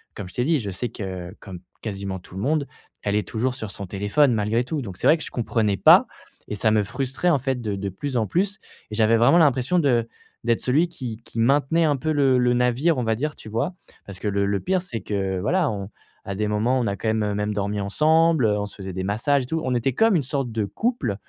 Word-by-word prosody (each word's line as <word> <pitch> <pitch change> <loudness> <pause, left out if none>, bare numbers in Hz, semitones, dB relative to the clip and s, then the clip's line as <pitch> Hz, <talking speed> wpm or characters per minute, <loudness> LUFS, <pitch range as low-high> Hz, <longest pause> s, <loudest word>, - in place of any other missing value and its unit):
comme 100 - -6
je - - -14
t'ai 125 - +1
dit, 160 0 +2
je 100 -5 -4
sais 120 +6 -3
que 95 -4 -6
comme 95 -3 -9 0.2
quasiment 100 -3 -4
tout 90 - -15
le 95 - -4
monde, 145 +2 0 0.4
elle 100 0 0
est 105 -2 0
toujours 125 +3 -1
sur 110 -5 -6
son 100 - -6
téléphone 100 +9 +2
malgré 110 +2 +1
tout, 150 +3 -3
donc 95 -7 -7
c'est - - -4
vrai - - +7
que 155 - -7
je - - -7
comprenais 110 -4 0
pas - - +7 0.4
et - - -3
ça 110 +2 +2
me 105 -1 +3
frustrait 135 - -1
en 165 - +4
fait 130 -1 -2
de 105 -3 -2
de 100 0 -3
plus 130 +7 -4
en 110 -2 +1
plus 195 - 0 0.3
et - - -4
j'avais 110 +1 +4
vraiment 120 +9 +5
l'impression 145 +3 +3
de 120 -7 +2 0.4
d'être 115 -1 +2
celui 150 +7 +2
qui 120 -8 -6
qui 115 - -7
maintenait 140 +7 +3
un 150 -2 +2
peu 155 +4 -2
le 135 -3 +3
le 125 0 +3
navire, 125 +6 +2
on - - 0
va 110 -1 +1
dire, 150 +6 -3
tu - - -12
vois? 135 - -2 0.3
Parce 100 -2 -9
que 105 - -3
le 100 0 +1
le 100 0 0
pire 185 0 0
c'est 125 -11 -5
que, 95 -1 -2
voilà, 170 - +1
on 100 -2 -5 0.4
à 100 - -4
des 105 +2 -1
moments, 110 +5 +1
on 120 - 0
a 100 - -1
quand 110 - -4
même, 105 -2 0
même 105 +1 -1
dormi 100 0 -2
ensemble, 155 +7 +3
heu, 105 -1 +2
on 100 - -2
se - - -12
faisait 95 -1 -7
des 95 +1 -3
massages 130 +8 +1
et - - -6
tout. 160 +4 -2
On 130 - -1
était 125 +2 0
comme 225 - +3
une - - +1
sorte 135 -2 -2
de 110 -2 -1
couple 160 - -1
115 Hz, 260 wpm, -23 LUFS, 100-145 Hz, 0.4 s, vrai